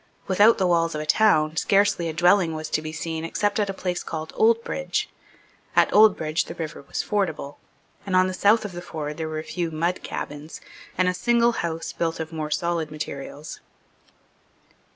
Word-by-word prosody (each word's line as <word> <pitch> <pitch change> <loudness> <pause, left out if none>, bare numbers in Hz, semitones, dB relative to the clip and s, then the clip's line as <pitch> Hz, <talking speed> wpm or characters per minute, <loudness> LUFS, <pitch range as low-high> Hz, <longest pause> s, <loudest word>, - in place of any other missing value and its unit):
Without 205 +5 +5
the 190 - +1
walls 165 -2 +2
of - - -2
the 155 - -4
town, 155 -4 +3
scarcely 195 -2 +2
a - - -4
dwelling 175 0 +3
was 155 0 -6
to - - +1
be 155 0 -6
seen 160 0 -4
except 205 +5 -1
at 205 -1 0
a - - +1
place 180 -2 -3
called 160 -1 -6
Oldbridge. 230 - +1 0.7
At - - +4
Oldbridge 190 -7 +4
the - - -8
river 160 -4 -6
was 140 - -4
fordable; 160 -8 -2 0.4
and 190 -2 -2
on 185 0 +5
the 185 - -2
south 210 +4 +3
of 205 - -5
the 175 0 -7
ford 150 -2 -6
were 155 -1 -3
a 155 - -4
few 170 0 -3
mud 170 +3 -1
cabins, 150 +2 -6 0.4
and 185 0 +3
a 180 - +2
single 235 +5 +3
house 165 -7 -4
built 165 -1 -2
of 160 0 -5
more 155 -1 -3
solid 165 +1 -1
materials. 150 0 -7
170 Hz, 185 wpm, -24 LUFS, 155-195 Hz, 0.7 s, Without